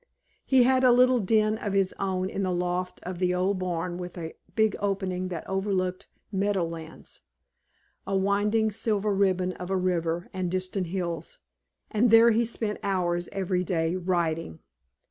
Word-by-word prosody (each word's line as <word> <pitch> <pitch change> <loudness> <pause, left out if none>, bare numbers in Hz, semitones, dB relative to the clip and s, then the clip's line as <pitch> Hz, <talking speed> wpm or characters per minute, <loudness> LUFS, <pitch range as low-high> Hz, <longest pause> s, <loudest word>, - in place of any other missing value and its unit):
He 260 -2 +4
had 260 +1 +3
a 255 - +7
little 250 +1 +5
den 215 +1 +2
of 205 - -3
his 195 -1 +2
own 185 -1 -1
in 195 - -4
the 185 -1 0
loft 180 +1 -2
of 180 -1 -6
the 180 -1 +1
old 185 +2 0
barn 175 -1 -3
with 180 0 -7
a 165 -1 -6 0.2
big 220 -2 +3
opening 190 -2 -1
that 175 -3 -6
overlooked 190 -1 -1 0.2
meadow 195 -2 +1
lands, 165 -1 -9 0.9
a 195 0 +1
winding 205 +3 +2
silver 210 -1 0
ribbon 185 -2 +1
of 180 0 -8
a 190 - +1
river 175 -1 -1
and 185 -2 -2
distant 185 0 -2
hills, 180 - -4 0.5
and 225 +3 +3
there 230 +1 +7
he 230 +2 +2
spent 220 -2 -2
hours 175 -3 -1
every 185 -2 -1
day 165 -1 0
writing. 170 - -1
185 Hz, 165 wpm, -27 LUFS, 180-205 Hz, 0.9 s, a